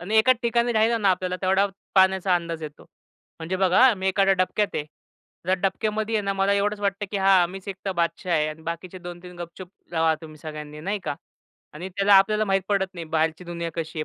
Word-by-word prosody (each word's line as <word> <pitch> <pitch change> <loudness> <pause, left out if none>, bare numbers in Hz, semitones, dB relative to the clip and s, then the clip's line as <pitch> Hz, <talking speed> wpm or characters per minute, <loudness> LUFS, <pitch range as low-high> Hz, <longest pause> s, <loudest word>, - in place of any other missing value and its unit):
आणि 210 +6 -1
एकाच 255 +3 +5
ठिकाणी 235 0 +1
राहिला 225 +1 +3
ना, 200 -2 +2
आपल्याला 185 0 -1
तेवढा 190 +2 +3 0.3
पाण्याचा 190 -1 +4
अंदाज 170 -2 -3
येतो. 150 -1 -9 0.5
म्हणजे 170 +3 -3
बघा 190 +2 +3
हा, 255 -4 +6
मी 190 0 -2
एखाद्या 195 0 +3
डबक्यात 190 +3 0
आहे. 150 - -1 0.6
जर 185 - +3
डबक्यामधी 215 +3 -1
आहे 210 - +1
ना, 195 - 0
मला 195 +1 +1
एवढंच 205 +1 0
वाटतं 200 0 -1
की 205 - -2
हां, 190 -2 +4
मीच 190 0 -9
एकटा 195 0 -4
बादशहा 170 +1 -1
आहे 155 -1 +2
आणि 155 +1 -8
बाकीचे 170 +3 -6
2-3 175 0 -10
गपचूप 175 +1 -9 0.2
रहा, 160 -1 +2
तुम्ही 155 -1 -11
सगळ्यांनी 150 -1 -8
नाही 200 +6 -2
का? 145 - -2 0.6
आणि 175 +5 -7
त्याला 200 0 +5
आपल्याला 210 +2 +4
माहीत 195 -1 +1
पडत 195 -2 +1
नाही, 170 - -6
बाहेरची 160 +2 -1
दुनिया 170 -1 -4
कशी 160 -1 -5
आहे? 155 - -1
185 Hz, 210 wpm, -24 LUFS, 170-200 Hz, 0.6 s, हा